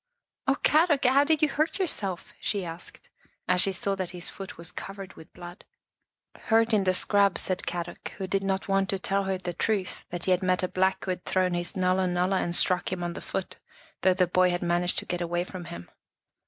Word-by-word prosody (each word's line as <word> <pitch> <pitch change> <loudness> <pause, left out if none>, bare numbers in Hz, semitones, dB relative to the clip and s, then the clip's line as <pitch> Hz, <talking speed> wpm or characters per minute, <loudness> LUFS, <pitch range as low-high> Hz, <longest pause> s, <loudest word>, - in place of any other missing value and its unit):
" - - -50
Oh, 270 - +4
Kadok, 305 -3 +4
how 265 +3 +6
did 310 0 +2
you - - +6
hurt 310 +5 0
yourself?" 200 - -3
she 200 -3 0
asked, 165 +1 -8 0.4
as 180 0 +3
she 195 - +2
saw 195 +1 -1
that 190 -2 -3
his 175 -1 -6
foot 195 -1 -8
was 170 +1 -9
covered 195 +1 -7
with 160 - -14
blood. 175 +1 -11 0.4
" - - -26
Hurt 225 0 +4
in 200 -3 +3
the 185 0 +3
scrub," 200 0 +3
said 185 -1 0
Kadok, 175 0 -4
who 195 - -3
did 195 +1 0
not 195 0 -1
want 195 0 +2
to 195 - +1
tell 195 +1 0
her 190 0 0
the 180 -1 -5
truth, 200 0 -1
that 175 0 -5
he 185 - +2
had 180 - +3
met 185 0 +1
a - - +2
Black 190 +1 +1
who 185 - 0
had 180 0 -4
thrown 185 -1 +1
his 175 0 -3
nulla 185 0 +2
nulla 180 +2 +1
1 - - +1
and 175 - -1
struck 180 0 +2
him 180 -1 -3
on 175 0 -2
the - - -7
foot, 190 - -4 0.4
though 185 -1 +4
the 185 -1 +4
boy 180 +1 +3
had 175 0 -1
managed 175 +1 +1
to - - -2
get 175 0 -3
away 175 0 0
from 180 -1 -8
him. 170 - -8
185 Hz, 235 wpm, -27 LUFS, 175-195 Hz, 0.4 s, how